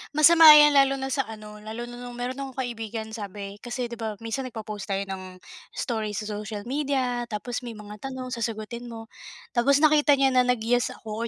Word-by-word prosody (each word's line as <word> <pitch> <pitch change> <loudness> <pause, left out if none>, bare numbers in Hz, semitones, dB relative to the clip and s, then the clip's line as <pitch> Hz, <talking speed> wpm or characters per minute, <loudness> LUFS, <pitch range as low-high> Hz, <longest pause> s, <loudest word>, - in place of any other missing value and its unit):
Masama 315 0 +9
yan 295 0 +8
lalo 275 -1 +4
na 265 0 -4
sa 270 0 0
ano, 215 -1 -10
lalo 220 +3 -7
na 240 0 -9
nung 245 0 -8
meron 250 +2 -4
akong 270 -2 -6
kaibigan 225 -2 -5
sabi 205 -2 -7
kasi 240 +1 -5
'di 235 - -7
ba 220 -2 -3
minsan 240 +4 -3
nagpo-post 215 -4 -7
tayo 195 0 -1
ng 190 -1 -7 0.4
story 220 -3 -3
sa 215 - -3
social 210 0 -5
media, 255 -2 -1
tapos 235 +2 -4
may 240 -2 -8
mga 210 0 -10
tanong 260 +1 -6
sasagutin 235 +1 -4
mo. 225 -1 -9 0.4
Tapos 275 +4 +3
nakita 300 -1 +5
niya 270 -1 +3
na 250 -1 +3
nag 250 -3 +1
yes 245 +2 +1
ako 220 +1 -5
240 Hz, 195 wpm, -25 LUFS, 215-260 Hz, 0.4 s, Masama